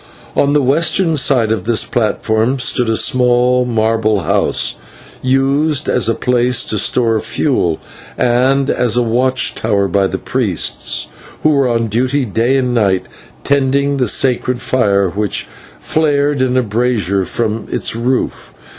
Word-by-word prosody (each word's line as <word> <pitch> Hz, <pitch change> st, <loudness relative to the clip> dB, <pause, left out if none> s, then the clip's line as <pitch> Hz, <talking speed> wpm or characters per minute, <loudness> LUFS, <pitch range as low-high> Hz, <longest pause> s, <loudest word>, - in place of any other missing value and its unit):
On 145 Hz, 0 st, +2 dB
the 145 Hz, -1 st, +2 dB
western 165 Hz, +5 st, +1 dB
side 130 Hz, -6 st, +2 dB
of 110 Hz, -4 st, -2 dB
this 115 Hz, -1 st, +1 dB
platform 110 Hz, +2 st, -1 dB
stood 125 Hz, -2 st, +1 dB
a 110 Hz, -, +1 dB
small 125 Hz, 0 st, +2 dB
marble 110 Hz, -3 st, 0 dB
house, 100 Hz, +4 st, 0 dB, 0.5 s
used 140 Hz, +3 st, +1 dB
as 120 Hz, -2 st, +1 dB
a 115 Hz, -, +1 dB
place 125 Hz, -1 st, +1 dB
to 110 Hz, -, +1 dB
store 115 Hz, 0 st, +1 dB
fuel, 110 Hz, -, -1 dB, 0.4 s
and 130 Hz, +3 st, +1 dB
as 120 Hz, -1 st, 0 dB
a 125 Hz, -, +3 dB
watch 125 Hz, +3 st, +1 dB
tower 100 Hz, -3 st, 0 dB
by 95 Hz, +1 st, +1 dB
the -, -, -4 dB
priests, -, -, -1 dB, 0.4 s
who 155 Hz, -, +4 dB
were 140 Hz, -3 st, +2 dB
on 115 Hz, -1 st, 0 dB
duty 125 Hz, +5 st, 0 dB
day 115 Hz, +5 st, 0 dB
and 125 Hz, -2 st, -1 dB
night, 100 Hz, -6 st, +1 dB, 0.4 s
tending 140 Hz, 0 st, +1 dB
the 125 Hz, -, 0 dB
sacred 125 Hz, -1 st, +1 dB
fire 100 Hz, -7 st, +1 dB
which 105 Hz, +2 st, -2 dB, 0.3 s
flared 145 Hz, -3 st, 0 dB
in 130 Hz, 0 st, +1 dB
a 130 Hz, -, +2 dB
brazier 105 Hz, -4 st, -1 dB
from 110 Hz, +2 st, -3 dB
its -, -, -2 dB
roof. 125 Hz, +3 st, -3 dB
125 Hz, 145 wpm, -15 LUFS, 110-135 Hz, 0.5 s, who